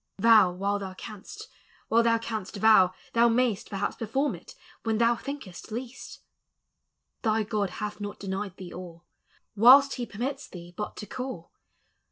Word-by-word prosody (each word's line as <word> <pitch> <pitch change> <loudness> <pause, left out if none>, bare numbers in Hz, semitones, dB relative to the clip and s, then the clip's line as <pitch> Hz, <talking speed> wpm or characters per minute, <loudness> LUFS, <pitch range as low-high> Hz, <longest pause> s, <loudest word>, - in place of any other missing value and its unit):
Vow 215 -3 +6
while 200 +3 -1
thou 190 -1 -7
canst; 235 - -9 0.4
while 230 +1 +4
thou 230 0 +3
canst 220 -3 -5
vow, 200 -3 +5 0.2
thou 235 0 +5
may's! 235 -3 +1
Perhaps 200 -1 -3
perforin 265 +6 -1
it - - -14 0.3
when 225 -1 0
thou 235 +1 +3
thinkest 235 -7 -8
least. 245 +2 -7 1.0
Thy 220 -1 +1
(Jod 210 -2 -1
hath 210 +1 -6
not 205 0 -6
denied 195 -1 -4
thee 185 -2 -9
all, 175 -2 -10 0.5
Whilst 265 +6 +7
he 240 -1 -4
permits 260 +6 -4
thee 175 -1 -11
hut 210 - -5
to 210 - -6
call. 250 -6 -6
215 Hz, 155 wpm, -27 LUFS, 195-235 Hz, 1.0 s, Whilst